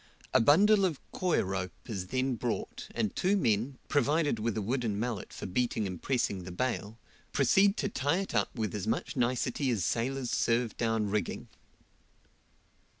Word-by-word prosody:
A - - +6
bundle 195 - +5
of 170 -7 +1
coir 180 -2 +1
rope 95 -1 -3
is 95 -6 -4
then 130 +4 0
brought, 115 - -3
and 105 - -1
two 195 +3 +2
men, 120 - +1
provided 145 -3 +2
with 110 0 -1
a - - 0
wooden 115 -2 -1
mallet 120 -2 -3
for - - -7
beating 110 +2 0
and 90 -3 -5
pressing 115 -8 0
the 90 - -7
bale, 115 +1 -2 0.4
proceed 195 - +4
to - - 0
tie 145 -4 0
it 195 - -6
up 100 -3 +2
with 110 -3 -2
as 105 0 -3
much 115 +7 -1
nicety 125 +2 0
as 105 -8 0
sailors 125 +4 -1
serve 115 -1 +1
down 110 -3 0
rigging. 105 0 -2
120 Hz, 165 wpm, -30 LUFS, 105-140 Hz, 0.4 s, A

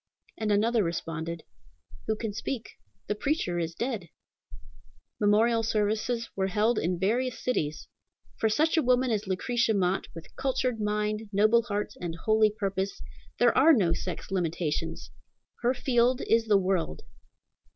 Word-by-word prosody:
and 215 -1 -1
another 220 +3 +3
responded, 165 -1 -4 0.6
"Who 220 - +1
can 215 -1 -4
speak? 225 +2 -4 0.3
the - - -1
preacher 210 - -1
is 165 0 -3
dead!" 225 -9 -3 1.1
Memorial 225 +3 +3
services 220 +2 0
were 190 -1 0
held 215 +5 +1
in 175 +2 -1
various 235 +7 0
cities. 155 -12 -2 0.5
For 220 - +2
such 315 +10 +2
a - - +5
woman 255 -1 +2
as 210 -2 -1
Lucretia 225 +4 +1
Mott, 185 -1 0
with 165 - -11
cultured 255 -3 -1
mind, 210 +1 -1
noble 215 +3 +4
heart, 210 -2 -3
and 170 -2 -4
holy 215 +5 +3
purpose, 200 -2 -3 0.4
there 240 -1 +4
are 310 +5 +7
no 185 - +3
sex 180 +2 -5
limitations. 170 -4 -2 0.5
Her 245 +2 +2
field 250 -1 +2
is 225 0 +2
the 210 -2 +5
world. 185 - -1
215 Hz, 140 wpm, -28 LUFS, 190-235 Hz, 1.1 s, are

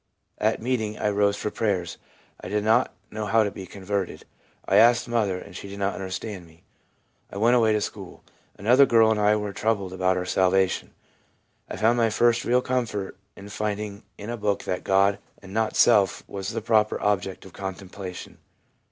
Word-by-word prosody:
At - - +1
meeting 110 -3 -2
I 105 - 0
rose 100 0 +2
for 105 - -3
prayers. 95 -6 -2 0.4
I - - -8
did 105 +2 -1
not 115 +4 +3 0.2
know 105 -1 -4
how 110 +2 +4
to 100 - -2
be 95 -2 -9
converted; 100 0 -4 0.4
1 - - +1
asked 120 +4 +5
mother, 110 -6 0
and 90 0 -11
she 100 - -8
did 100 - -8
not 100 0 -1
understand 95 -1 -6
me. 80 +1 -22 0.7
I - - -7
went 115 +4 +4
away 115 -3 +4
to 105 - +1
school. - - -7 0.3
Another 125 +7 +5
girl 115 -2 +5
and 110 - +1
I 105 0 +4
were 105 -1 -3
still - - -10
troubled 100 -4 0
about 95 0 +1
our 90 - -2
salvation. 95 +1 +1 0.7
I - - -5
found 115 +3 +3
my 115 -1 +3
first 120 +2 +2
real 125 +1 +2
comfort 115 -6 -2 0.2
in 100 +1 -11
finding 105 0 -4 0.2
in 105 +3 -6
a 120 - -4
book 105 -2 -1
that 90 - -3
God, 100 +1 +3 0.2
and 95 -1 -12
not 110 0 0
self, 105 -5 +3
was 95 -1 -5
the - - -3
proper 110 -1 +2
object 95 -2 -1
of 95 - -13
contemplation. 95 -1 -8
105 Hz, 190 wpm, -25 LUFS, 95-110 Hz, 0.7 s, asked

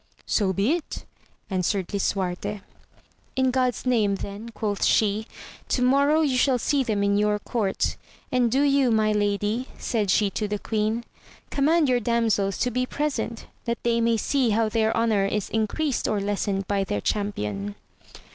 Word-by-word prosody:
So 200 -4 +1
be 195 - +1
it, 335 -2 -3 0.5
answered 185 0 0
Lisuarte. 195 0 -2 0.7
In 260 -1 +2
God's 255 -1 0
name 220 -6 +2
then, 200 +4 -7
quoth 210 -3 -3
she, 215 +1 +2 0.4
to 250 - 0
morrow 280 +5 +4
you 275 -5 +1
shall 265 -2 +3
see 280 +3 +1
them 210 -4 0
in 200 0 +2
your 210 0 +2
court; 210 -1 -1 0.3
and 245 -2 +2
do 270 +4 +3
you 280 -2 +3
my 215 -1 +3
lady, 210 +4 0
said 215 -4 -1
she 200 +1 +3
to 210 - -2
the 210 0 -2
queen, 220 +2 -1 0.5
command 305 +2 +3
your 250 -1 +3
damsels 225 -4 +1
to 250 - +1
be 255 +1 -1
present, 285 -6 -3 0.2
that 235 0 -1
they 235 0 +2
may 230 0 +2
see 260 +2 +1
how 220 +1 +2
their 220 0 +1
honour 220 -4 +2
is 210 0 -2
increased 235 +6 0
or 210 - 0
lessened 200 -1 -1
by 200 -1 +1
their 105 - -2
champion. 105 - -2
220 Hz, 165 wpm, -25 LUFS, 200-250 Hz, 0.7 s, morrow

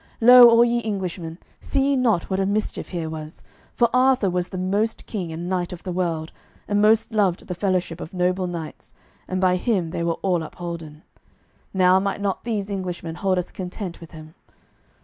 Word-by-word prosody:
Lo 245 +1 +9
all 230 +1 +6
ye 235 0 0
Englishmen, 180 -5 -4 0.2
see 275 0 0
ye 280 - +3
not 230 -9 +1
what 190 0 -1
a 195 - +1
mischief 210 +2 -2
here 170 -3 -3
was, 155 0 -8 0.3
for 240 - +3
Arthur 255 -6 +3
was 180 0 -1
the 185 - -6
most 200 +5 -1
king 185 -7 -4
and 170 +2 -5
knight 180 -1 -1
of 180 - -9
the 185 - -4
world, 165 -3 -2 0.4
and 205 0 +1
most 220 +2 +3
loved 200 -5 +1
the 180 - -4
fellowship 180 -2 -1
of - - -7
noble 180 0 0
knights, 170 -3 -7 0.3
and 185 - -2
by 185 -1 +3
him 185 -5 0
they 170 - -3
were 170 -1 -1
all 180 -3 +1
upholden. 160 -2 -7 0.7
Now 185 0 +4
might 200 +1 -2
not 200 -2 -2
these 210 -3 -2
Englishmen 180 -4 -4
hold 185 +2 0
us 180 - -3
content 180 -1 -6
with 165 - -11
him. 155 -1 -12
185 Hz, 190 wpm, -23 LUFS, 170-205 Hz, 0.7 s, Lo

